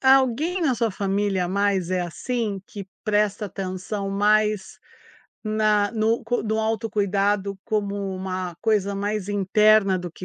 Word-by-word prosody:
alguém 270 +7 +3
na 295 -6 +2
sua 230 -1 +1
família 195 -2 0
mais 195 -2 0
é 185 -1 +1
assim? 205 +3 -3
Que 200 -3 -9 0.2
presta 210 0 +1
atenção 195 +1 -4
mais 210 0 +1 0.6
na 215 -1 +2
no 225 0 +1
cui 240 +2 -1
no 220 0 0
autocuidado 205 -2 0
como 205 -2 -1 0.2
uma 185 -2 -4
coisa 205 -3 +1
mais 205 0 -2
interna 205 0 +4
do 175 -1 -6
que 185 - -10
205 Hz, 135 wpm, -24 LUFS, 195-215 Hz, 0.6 s, interna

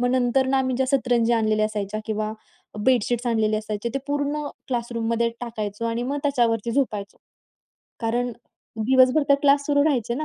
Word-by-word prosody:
मग 245 - +2
नंतर 255 +1 +2
ना, 265 0 +2
आम्ही 260 -1 0
ज्या 265 +1 +1
सतरंजी 245 -3 +2
आणलेल्या 215 -2 +2
असायच्या 215 0 -4
किंवा 215 -1 -2 0.5
बेडशीट्स 245 -1 +2
आणलेले 220 -2 +1
असायचे 215 +1 -3
ते 275 - +1
पूर्ण 290 +1 -1 0.2
क्लासरूममध्ये 235 -2 -1
टाकायचो 220 -3 -4
आणि 230 +1 -2
मग 275 +4 -2
त्याच्यावरती 235 -5 +1
झोपायचो, 215 -7 -1 0.8
कारण 240 +1 -1 0.5
दिवसभर 255 +5 +4
तर 280 - +7
क्लास 280 0 +4
सुरू 285 -1 +3
राहायचे 245 -6 +1
ना. 305 +5 -3
240 Hz, 160 wpm, -24 LUFS, 220-265 Hz, 0.8 s, तर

